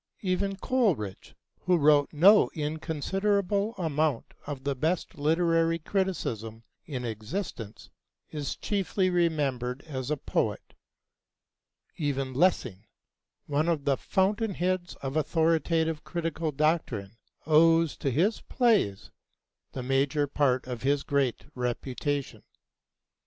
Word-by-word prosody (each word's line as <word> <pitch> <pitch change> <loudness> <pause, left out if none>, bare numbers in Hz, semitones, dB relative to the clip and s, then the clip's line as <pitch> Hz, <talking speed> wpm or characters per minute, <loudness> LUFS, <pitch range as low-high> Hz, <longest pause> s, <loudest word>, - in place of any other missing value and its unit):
Even 195 +1 0
Coleridge, 190 - -1 0.2
who 180 -1 +2
wrote 145 -2 +4
no 195 +8 +6
inconsiderable 195 +7 -1
amount 155 -6 -1
of 140 -3 -5
the 140 0 0
best 160 +6 -1
literary 165 +2 +2
criticism 120 - -3 0.2
in 130 -6 -4
existence, 115 - -6 0.4
is 145 -3 -3
chiefly 195 -2 0
remembered 140 -7 0
as 130 -4 -5
a 150 - 0
poet; - - -2 1.2
even 135 -3 -2
Lessing, 125 - +1 0.6
one 150 +3 0
of 155 -4 -1
the 140 - +3
fountain 200 - 0
heads 180 0 -1
of 135 +1 -3
authoritative 160 0 +1
critical 165 -2 -3
doctrine, 135 -9 -1 0.3
owes 165 +1 +4
to 140 - -1
his 175 - +1
plays 215 - +1 0.6
the 130 - -4
major 135 +3 +1
part 135 -2 +1
of 125 -2 -6
his 140 +1 +1
great 140 -4 0
reputation. 130 +3 -3
155 Hz, 110 wpm, -28 LUFS, 135-175 Hz, 1.2 s, no